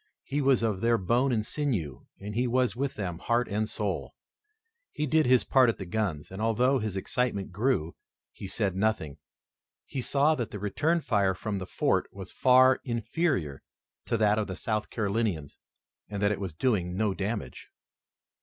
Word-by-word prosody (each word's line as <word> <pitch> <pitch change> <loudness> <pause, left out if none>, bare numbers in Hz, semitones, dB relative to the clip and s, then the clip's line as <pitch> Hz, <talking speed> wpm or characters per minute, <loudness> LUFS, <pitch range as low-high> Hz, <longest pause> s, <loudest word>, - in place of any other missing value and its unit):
He 145 +2 -2
was 135 -4 +3
of 105 -4 0
their 115 0 +3
bone 120 +8 +1
and 110 -3 0
sinew, 110 - -3
and 105 +1 -6
he 125 +3 +1
was 125 0 +1
with 135 +2 -2
them, 90 -5 -4
heart 120 +3 +1
and 105 +1 -1
soul. - - -3 0.8
He 150 - -2
did 155 0 +3
his 125 -1 +5
part 130 -3 +4
at 115 - -1
the 95 - -6
guns, 90 -6 -2
and, 95 +2 -6
although 125 +4 +2
his 105 -4 -3
excitement 100 -1 -1
grew, 100 -5 0 0.4
he 100 - -8
said 95 -1 -1
nothing. 95 -8 -1 0.7
He 135 - -4
saw 145 +5 +3
that 120 -8 -3
the - - -6
return 150 - 0
fire 100 -8 +1
from 100 +1 -3
the 95 - -6
fort - - 0
was 95 -2 -8
far 130 0 +5
inferior 120 - -1 0.5
to 115 - +1
that 105 0 +3
of 105 - -1
the 95 - -5
South 110 +2 -2
Carolinians, 100 -8 -2 0.5
and 100 -1 -4
that 100 - +3
it 105 - -2
was 90 -5 -4
doing 90 -5 0
no 105 -2 +1
damage. 100 - -4
110 Hz, 180 wpm, -28 LUFS, 95-125 Hz, 0.8 s, his